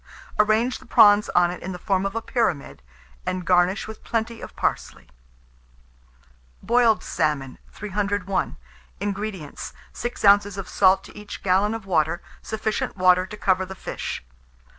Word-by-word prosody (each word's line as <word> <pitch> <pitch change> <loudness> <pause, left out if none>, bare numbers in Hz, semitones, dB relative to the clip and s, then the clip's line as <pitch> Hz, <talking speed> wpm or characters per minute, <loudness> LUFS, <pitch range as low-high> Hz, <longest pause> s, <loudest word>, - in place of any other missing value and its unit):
Arrange 220 +4 +3
the - - -16
prawns 210 -3 +6
on 175 0 +4
it 180 - -8
in 190 - -5
the - - -6
form 195 0 0
of 195 - -7
a 230 - -2
pyramid, 220 - -1 0.4
and 185 -1 -3
garnish 180 +3 +2
with 220 0 -10
plenty 230 0 -2
of - - -9
parsley. - - -2 1.6
BOILED 230 0 +3
SALMON. 150 -5 -1
301. 200 -1 -2 0.4
INGREDIENTS. 200 -6 -5 0.2
6 240 -3 -4
oz. 200 0 +5
of 195 - -5
salt 190 -1 +4
to - - -14
each 210 0 -9
gallon 200 +3 +2
of 225 -3 -7
water, 165 -3 +1 0.2
sufficient 220 -2 -3
water 185 0 +4
to 210 - -9
cover 190 -2 +2
the 190 +1 -7
fish. - - -5
195 Hz, 145 wpm, -24 LUFS, 185-215 Hz, 1.6 s, prawns